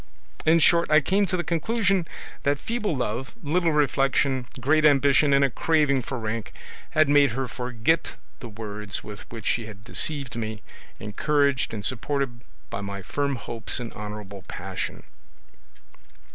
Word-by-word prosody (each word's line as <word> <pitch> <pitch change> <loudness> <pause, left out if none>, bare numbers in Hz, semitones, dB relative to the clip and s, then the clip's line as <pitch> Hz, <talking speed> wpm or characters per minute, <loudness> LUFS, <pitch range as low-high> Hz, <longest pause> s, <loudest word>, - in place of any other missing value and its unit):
In 160 +1 +7
short, 170 +1 +4
I 155 0 +7
came 195 +7 +2
to 185 - 0
the 175 - -1
conclusion 185 +2 +1 0.3
that 140 +1 +1
feeble 215 - -2
love, 125 - -3
little 165 +3 +2
reflection, 135 -3 +2
great 155 +5 +3
ambition, 140 0 +5
and 140 0 +5
a - - +1
craving 150 -2 +2
for 130 +2 -5
rank, 110 -1 -4 0.4
had 155 -1 +6
made 140 -4 +5
her 130 +1 -2
forget 125 +6 -1 0.2
the 120 - -8
words 105 -2 -6
with 105 0 -10
which 115 -3 -8
she 115 -2 0
had 105 -2 -11
deceived 140 +2 -2
me, 110 -2 -4 0.4
encouraged 140 +6 +1
and 105 -2 -5
supported 130 -1 -1 0.3
by - - -3
my 100 -1 -5
firm 140 +4 -1
hopes 115 0 -4
and 120 -2 -6
honourable 105 -2 -7
passion. - - -5
135 Hz, 150 wpm, -25 LUFS, 115-150 Hz, 0.4 s, In